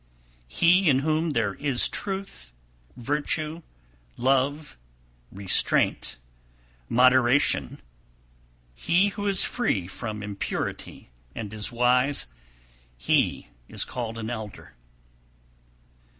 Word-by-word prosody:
261. - - -11 0.2
He 175 - +3
in 135 -2 +3
whom 160 +1 0
there 115 -8 0
is 140 -1 +1
truth, 195 - -3 0.5
virtue, 150 +5 -2 0.6
love, 135 +4 0 0.6
restraint, 95 -9 +1 0.7
moderation, 125 - +3 0.9
he 175 - +2
who 205 0 -5
is 195 -1 +5
free 110 - -1
from 105 +3 -6
impurity 100 -10 -5 0.2
and 105 -2 -6
is 105 -1 -2
wise, 125 +3 +2 0.7
he - - 0 0.2
is - - -1
called 115 -2 -5
an 115 +1 -5
elder. 110 -3 -8
125 Hz, 95 wpm, -25 LUFS, 110-150 Hz, 0.9 s, is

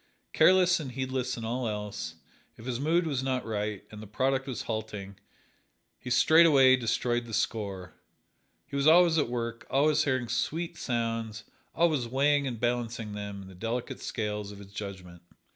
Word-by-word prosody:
Careless 185 -1 +5
and 135 -5 -6
heedless 130 -1 -2
in 115 - -5
all 120 +2 -2
else, 105 -6 -4 0.4
if 110 - -12
his 125 -1 -3
mood 165 +5 +2
was 140 -5 -1
not 130 -1 -1
right 105 -2 -3
and 105 0 -9
the 110 - -9
product 135 +5 0
was 130 - -4
halting, 105 -3 -5 0.8
he 125 - -7
straightway 140 -2 +6
destroyed 120 0 0
the 115 - -3
score. 100 -5 -2 0.7
He 140 - -9
was 140 +1 +2
always 165 0 +6
at 145 - 0
work, 115 -1 -4
always 150 +2 +3
hearing 130 -4 0
sweet 160 +9 -2
sounds, 115 -6 -3 0.3
always 155 -8 +2
weighing 140 +3 +2
and 120 -4 -4
balancing 120 -2 -2
them 100 -1 -6
in - - -12
the 95 - -12
delicate 115 +6 -4
scales 105 -2 -3
of 100 - -10
his 100 0 -13
judgment. 95 -4 -8
120 Hz, 165 wpm, -29 LUFS, 105-135 Hz, 0.8 s, straightway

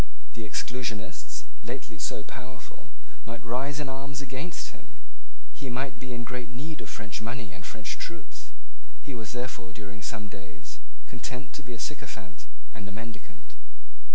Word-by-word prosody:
The 110 -2 -1
Exclusionists, 120 -2 +3 0.2
lately - - -1
so 105 - +4
powerful, 120 -2 -5 0.3
might 115 0 -2
rise 135 +5 +5
in 150 - +4
arms 135 +1 +1
against 140 +5 +1
him. - - -12 0.6
He 135 - -1
might 130 +2 +3
be 130 - -1
in 120 -1 +3
great 125 -1 +1
need 150 +6 0
of - - -2
French 105 0 0
money 115 -5 +1
and 85 - -5
French 110 0 0
troops. 170 -2 -2 0.6
He 140 - 0
was 115 -1 0
therefore, 100 -7 +1
during 100 -1 -3
some 105 +1 +2
days, 95 -4 -6 0.3
content 125 +1 -1
to - - -1
be 125 -3 -2
a - - -5
sycophant 120 -11 -1 0.3
and 100 -3 -2
a - - -3
mendicant. 110 -1 -4
120 Hz, 155 wpm, -35 LUFS, 105-130 Hz, 0.6 s, rise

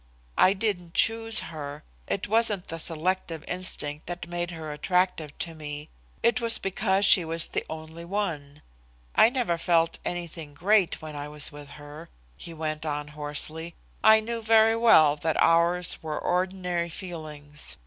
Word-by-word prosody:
I 190 - +6
didn't 190 -5 -3
choose 225 0 +2
her. 145 -1 -7 0.2
It 200 - -2
wasn't 215 -3 +2
the 165 - -5
selective 165 0 -1
instinct 155 -5 -3
that 175 0 -5
made 175 0 -3
her 160 -3 -7
attractive 165 -1 -1
to 165 - -4
me. 150 -1 -7 0.3
It 240 +1 +2
was 230 -1 +3
because 195 +1 0
she 190 -2 +7
was 165 0 0
the - - -2
only 160 +1 -8
one. 165 -7 -4 0.5
I - - +6
never 240 -10 -1
felt 165 0 +1
anything 170 -4 -6
great 190 0 +2
when 155 -1 -7
I 145 0 -5
was 150 -1 +2
with 145 -1 -11
her," 150 +2 -11 0.3
he 170 - -10
went 155 -1 -4
on 150 -1 -3
hoarsely. 150 +3 -1 0.3
"I 220 0 +7
knew 230 +1 -4
very 225 0 +4
well 160 -11 +6
that 160 +1 -1
ours 170 +1 +2
were 155 -1 -4
ordinary 180 -1 -1
feelings. 155 -4 -3
170 Hz, 155 wpm, -26 LUFS, 155-190 Hz, 0.5 s, she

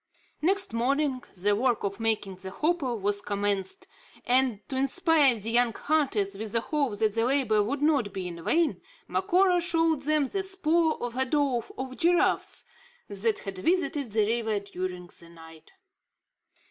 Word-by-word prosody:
Next 385 - +1
morning, 265 +3 0
the 205 +3 +1
work 240 +1 0
of 200 +1 -3
making 215 -4 -1
the 190 0 -8
hopo 300 - -1
was 205 -1 -1
commenced; 200 - -2 0.4
and 250 -3 +3
to 265 - -5
inspire 275 0 +3
the 220 +2 -3
young 240 -1 +3
hunters 250 -11 0
with 210 +1 -6
the 230 - +3
hope 275 -6 -1
that 215 -1 +1
the 225 +1 +1
labour 245 -4 +2
would 270 +8 -2
not 280 -9 +2
be 190 -2 -5
in 170 -1 -8
vain, 330 - +1 0.3
Macora 370 -1 +2
showed 330 -3 +1
them 300 0 +2
the 390 +9 -2
spoor 340 -4 +1
of 245 -1 -4
a 260 +1 +2
drove 265 -3 0
of 260 0 -6
giraffes 345 +1 +1 0.5
that 210 +2 0
had 195 -1 -6
visited 315 - 0
the 215 0 +2
river 220 -1 0
during 185 -2 -6
the 170 - -13
night. 160 -1 -15
245 Hz, 160 wpm, -27 LUFS, 205-305 Hz, 0.5 s, and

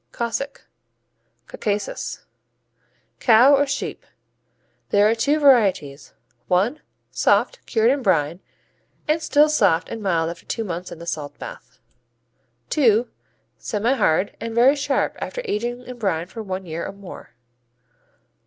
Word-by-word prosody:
Cossack 240 +4 -4 0.8
Caucasus 205 -1 -4 0.9
Cow 245 +4 +6
or 285 +1 +2
sheep. 280 - -4 0.9
There 205 +1 +4
are 220 - +3
two 285 +7 +1
varieties: 195 - +2 0.3
I. 195 +11 +2 0.3
Soft, - - +1
cured 225 0 +3
in 280 0 0
brine 170 - +1 0.7
and 310 +2 +1
still 300 -1 +4
soft 195 - +2
and 225 - -6
mild 170 -4 0
after 170 - -13
two 225 - -2
months 180 -2 -5
in - - -8
the 170 - -10
salt 150 -4 -5
bath. - - -10 1.0
II. 235 -5 +4 0.5
Semihard 210 -5 0
and 230 0 -5
very 255 +5 +5
sharp 285 -1 -1
after - - -5
aging 240 +4 -3
in 250 -1 -10
brine 175 -6 -1
for 225 +5 -8
a 190 -2 -4
year 170 -2 -6
or - - -7
more. 200 -10 -12
220 Hz, 130 wpm, -22 LUFS, 185-265 Hz, 1.0 s, Cow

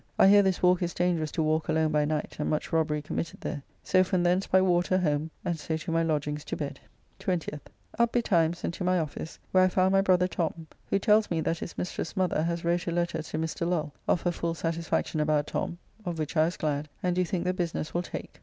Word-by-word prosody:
I 195 - +7
hear 205 0 +8
this 190 -2 0
walk 180 0 +5
is 175 -1 -2
dangerous 170 -3 +1
to 160 - +1
walk 155 +1 +1
alone 160 0 +2
by 150 -1 +2
night, 155 0 -2
and 150 - -1
much 155 - -2
robbery 150 -2 +1
committed 155 +1 -4
here. 145 - -3 0.2
So 185 0 +4
from 185 -1 0
thence 180 +2 +2
by 190 - +5
water 180 0 +3
home, 155 -3 0 0.2
and 170 -2 -1
so 160 +1 -2
to 160 +2 -5
my 165 0 +2
lodgings 150 -2 -1
to - - -3
bed. 140 -2 -4 0.4
20th. 170 -5 -2 0.4
Up 235 0 +4
betimes 170 -8 +1
and - - -1
to 180 - -5
my 185 0 +2
office, 160 0 -4
where 185 0 +5
I - - +6
found 185 0 +2
my 195 0 +5
brother 180 -2 +3
Tom, 165 -2 -3 0.2
who - - +3
tells 210 +1 +3
me 170 - 0
that 165 +1 -1
his - - -7
mistress's 180 +1 -4
mother 185 -4 +1
has 170 +1 -2
wrote 175 +1 +1
a - - 0
letter 170 -1 -1
to 155 - -5
Mr. 160 +1 -2
Lull 155 -5 -1
of 175 - +2
her 175 - +2
full 170 -1 -2
satisfaction 165 0 -1
about 150 -1 +2
Tom, 170 - -3 0.3
of 175 -3 -3
which 155 +1 -3
I 155 0 +5
was 170 - -3
glad, 150 -1 -2
and 180 -1 +1
do 180 - +2
think 180 -1 -2
the 180 0 0
business 170 -3 -3
will 175 - +1
take. 180 - -8
170 Hz, 240 wpm, -28 LUFS, 155-180 Hz, 0.4 s, hear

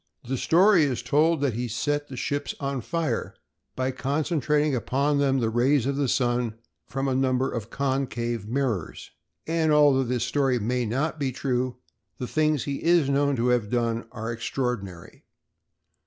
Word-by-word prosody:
The 135 - -1
story 175 - +4
is 125 -4 -2
told 150 +5 +2
that 140 -4 +1
he 120 +3 -2
set 145 +6 -1
the 130 - -8
ships 145 +3 -2
on 140 -2 -2
fire 160 -4 -2 0.4
by 130 0 -1
concentrating 150 +2 0
upon 140 +5 0
them 135 -1 +2
the 115 -2 0
rays 125 +2 +2
of 140 +1 0
the 140 -1 0
sun 120 -2 0 0.3
from 135 0 -2
a 135 - +1
number 130 0 +1
of 115 -2 -5
concave 125 -5 -2
mirrors. 120 - -2 0.3
And, 160 -1 +1
although 145 -3 +5
this 125 -2 -1
story 135 -1 +1
may 120 +2 -1
not 150 +8 -1
be 135 -2 0
true, 125 -1 -1 0.4
the 125 - -4
things 155 +1 +1
that 140 - -3
he 140 - -4
is 165 -4 +3
known 140 0 +2
to 120 0 +1
have 120 -4 +1
done 115 -1 -1
are 115 -1 -5
extraordinary. 115 -7 -4
130 Hz, 170 wpm, -26 LUFS, 120-145 Hz, 0.4 s, although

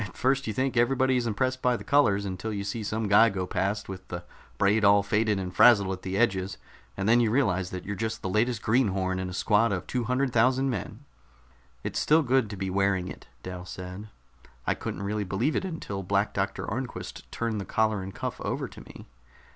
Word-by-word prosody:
"At - - -15
first 135 +1 +1
you 110 - -1
think 130 +2 -1
everybody 130 +2 +3
is 120 -2 0
impressed 130 +4 -1
by 125 -1 +2
the - - -9
colors, 100 -9 +3
until 95 +3 -4
you 100 -2 -3
see 105 +3 -3
some 110 +1 -2
guy 110 +3 +6
go 95 -3 -3
past 100 +3 -2
with 95 -1 -8
the 90 0 -6 0.3
braid 105 +2 +3
all 100 0 +6
faded 105 +1 +1
and 90 -1 -5
frazzled 100 -5 +6
at 95 -1 -5
the 95 +1 -3
edges, 95 -4 +1 0.4
and 95 +1 -1
then 115 +2 +5
you 115 -2 +3
realize 100 -7 +1
that 90 -1 -6
you're 100 - -3
just 110 +2 -3
the - - -1
latest 110 +4 0
greenhorn 95 -6 +1
in 95 0 -3
a - - -6
squad 110 +4 +2
of 95 -2 -2
two 125 -2 -2
hundred 125 +2 0
thousand 130 +3 +3
men." 110 +4 -6 0.8
"It's - - -2
still 155 +1 +4
good 130 -4 +2
to 105 - -6
be 95 0 -3
wearing 95 -1 +1
it," - - -10 0.2
Dal 90 -1 -6
said. 90 +3 -8 0.6
"I - - +2
couldn't 95 - -5
really 105 +1 -1
believe 100 - -1
it - - 0
until 160 - -5
Black 100 +2 0
Doctor 95 0 -2
Arnquist 125 +4 -6
turned 115 -3 -2
the - - -4
collar 110 -2 +1
and 95 +1 -6
cuff - - -5
over - - -2
to - - -12
me." - - -12
105 Hz, 220 wpm, -27 LUFS, 95-120 Hz, 0.8 s, guy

